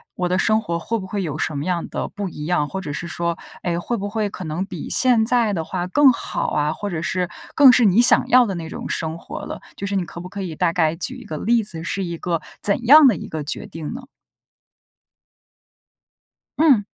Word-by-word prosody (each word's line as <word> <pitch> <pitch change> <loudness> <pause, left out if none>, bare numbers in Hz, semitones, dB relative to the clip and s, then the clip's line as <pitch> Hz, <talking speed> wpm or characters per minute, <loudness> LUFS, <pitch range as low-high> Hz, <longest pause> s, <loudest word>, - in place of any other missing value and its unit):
我 180 -1 -1
的 185 +1 +1
生 220 0 +2
活 170 -5 -3
会 230 +7 -2
不 190 - -6
会 200 +1 -3
有 150 -2 -4
什 155 - -2
么 145 - -3
样 180 -2 -1
的 - - -3
不 200 -2 -5
一 150 -2 -7
样。 160 -4 +1
或 190 - -4
者 150 - -5
是 170 - -5
说， 170 0 -2 0.3
哎， 170 -1 -1
会 240 +7 -2
不 205 +1 -4
会 215 -1 -1
可 185 - -8
能 165 +5 -3
比 180 -5 -7
现 245 -4 +3
在 235 -3 +2
的 165 -3 -2
话 180 +1 -3
更 275 +6 +5
好 - - -3
啊， 150 0 +1
或 205 +3 -5
者 160 -3 -3
是 180 0 -1 0.2
更 275 -3 +8
是 245 - +4
你 205 +4 +5
想 245 - +6
要 250 -1 +6
的 195 -4 -3
那 165 -1 -6
种 - - -6
生 160 0 -3
活 - - -8
了， - - -7
就 200 - -5
是 200 0 -2
你 185 - 0
可 170 - -9
不 180 - -9
可 200 0 -6
以 170 -4 -5
大 175 0 +1
概 160 -2 +1
举 255 +9 -4
一 250 - -12
个 155 -6 -5
例 230 +5 +2
子， 170 -5 -5
是 195 +2 -2
一 170 -1 -5
个 170 -1 -2 0.2
怎 210 +4 +3
样 295 0 +9
的 225 - +4
一 - - -7
个 155 -2 -5
决 145 - -4
定 160 +4 -7
呢？ 255 0 -8 2.5
嗯。 270 -11 +4
185 Hz, 260 characters per minute, -21 LUFS, 170-220 Hz, 2.5 s, 样